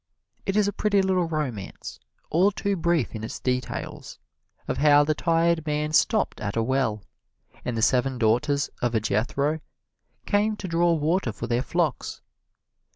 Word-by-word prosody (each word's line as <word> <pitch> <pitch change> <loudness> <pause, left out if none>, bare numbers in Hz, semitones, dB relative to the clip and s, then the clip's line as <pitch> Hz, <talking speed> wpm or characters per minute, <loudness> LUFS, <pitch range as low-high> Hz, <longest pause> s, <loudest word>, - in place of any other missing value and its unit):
It 195 - 0
is 210 -1 +3
a 205 - -1
pretty 205 0 +2
little 185 -2 +1
romance, 135 - -5 0.3
all 180 +5 +4
too 200 0 -1
brief 170 -5 0
in 110 -1 -6
its 110 - -5
details, 125 -1 -4 0.5
of - - -2
how 145 0 +6
the 155 +1 +1
tired 165 0 +1
man 150 +1 -1
stopped 215 - +2
at 105 -1 -3
a 115 - +2
well, 120 -4 0 0.6
and 120 -2 -3
the 110 - 0
seven 130 +2 +2
daughters 140 +6 +1
of 120 -2 +1
Jethro 135 +9 0 0.7
came 210 +1 +1
to 190 - -6
draw 170 0 +2
water 160 -3 0
for 110 - -6
their 120 +1 0
flocks. 160 -1 -1
150 Hz, 155 wpm, -25 LUFS, 120-170 Hz, 0.7 s, how